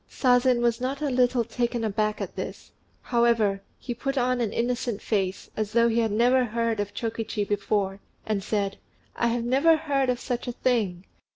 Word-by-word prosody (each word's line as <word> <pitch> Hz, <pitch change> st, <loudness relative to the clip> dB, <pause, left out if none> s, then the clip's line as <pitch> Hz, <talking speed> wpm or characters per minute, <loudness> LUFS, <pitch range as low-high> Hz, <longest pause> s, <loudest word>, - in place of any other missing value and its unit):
Sazen 250 Hz, -1 st, +3 dB
was 235 Hz, 0 st, +1 dB
not 265 Hz, +2 st, -2 dB
a 285 Hz, -, 0 dB
little 250 Hz, -1 st, +3 dB
taken 240 Hz, +1 st, -2 dB
aback 215 Hz, 0 st, 0 dB
at -, -, -5 dB
this; -, -, -6 dB, 0.3 s
however, 230 Hz, -5 st, +2 dB, 0.2 s
he 245 Hz, -, -5 dB
put 275 Hz, +4 st, -3 dB
on 250 Hz, -1 st, +1 dB
an 220 Hz, -3 st, 0 dB
innocent 240 Hz, -2 st, -1 dB
face, 195 Hz, -3 st, -2 dB
as 215 Hz, -1 st, -3 dB
though 235 Hz, 0 st, +4 dB
he 230 Hz, +1 st, +1 dB
had 225 Hz, -2 st, +1 dB
never 245 Hz, +4 st, +4 dB
heard 230 Hz, -1 st, -1 dB
of 205 Hz, 0 st, -3 dB
Chokichi 225 Hz, -2 st, -3 dB
before, 200 Hz, -1 st, -1 dB, 0.3 s
and 210 Hz, -3 st, -1 dB
said, 200 Hz, -2 st, -1 dB, 0.4 s
"I 235 Hz, 0 st, +1 dB
never 275 Hz, +7 st, +4 dB
heard 275 Hz, -4 st, 0 dB
of 245 Hz, -1 st, 0 dB
such 245 Hz, -1 st, -3 dB
a 245 Hz, -, -2 dB
thing! 215 Hz, -9 st, 0 dB
235 Hz, 180 wpm, -26 LUFS, 215-250 Hz, 0.4 s, though